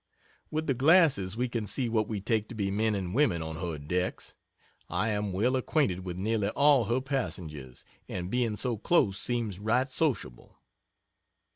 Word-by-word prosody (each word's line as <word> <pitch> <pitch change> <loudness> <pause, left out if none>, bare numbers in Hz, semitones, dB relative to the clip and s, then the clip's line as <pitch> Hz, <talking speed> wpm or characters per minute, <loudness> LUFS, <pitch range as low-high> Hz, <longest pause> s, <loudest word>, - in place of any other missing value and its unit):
With 155 +1 -2
the 135 - +1
glasses 130 - +4
we 125 +1 0
can 115 -3 -3
see 125 +4 -1
what 110 -2 0
we 105 -3 -3
take 110 +1 0
to 120 - -8
be 100 -2 -1
men 110 +1 +1
and 95 -2 -3
women 110 - +2
on 80 0 -5
her 85 -3 -3
decks. 90 +5 -3 0.5
I 105 +5 0
am 105 -1 -1
well 115 +8 +1
acquainted 130 - +1
with 90 -1 -5
nearly 105 +1 0
all 140 +1 +4
her 120 +5 0
passengers, 80 - -5 0.2
and 90 0 -4
being 120 -3 0
so 120 +1 -1
close 100 - +2
seems 115 -6 -2
right 125 +6 +1
sociable. 125 - -2
110 Hz, 170 wpm, -29 LUFS, 95-125 Hz, 0.5 s, glasses